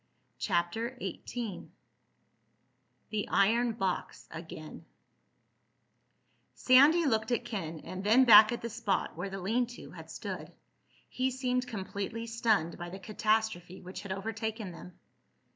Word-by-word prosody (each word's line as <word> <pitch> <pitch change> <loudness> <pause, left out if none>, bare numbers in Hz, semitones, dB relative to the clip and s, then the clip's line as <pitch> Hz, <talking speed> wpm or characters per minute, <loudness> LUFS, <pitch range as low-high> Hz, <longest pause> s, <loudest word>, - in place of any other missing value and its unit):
CHAPTER 220 +7 -1
XVIII 235 -6 -6 1.4
THE 215 -1 -2
IRON 230 +4 +3
BOX 195 -4 -3
AGAIN 160 -1 -9 1.7
Sandy 290 +7 +6
looked 220 -3 +1
at 240 0 0
Ken, 165 -9 -5
and 185 +1 -7
then 230 +6 +5
back 215 -1 +9
at 240 - -4
the 235 - -3
spot 210 -7 -1
where 180 +4 -4
the 195 0 -6
lean 230 +7 0
to - - -11
had - - -11
stood. - - -6 0.6
He 260 +1 -1
seemed 250 -1 -1
completely 205 +1 -4
stunned 220 -8 0
by 175 0 -5
the 190 - -7
catastrophe 215 -3 -1
which 185 +1 -7
had 200 - -7
overtaken 220 +1 -4
them. 175 +1 -12
215 Hz, 125 wpm, -31 LUFS, 190-235 Hz, 1.7 s, back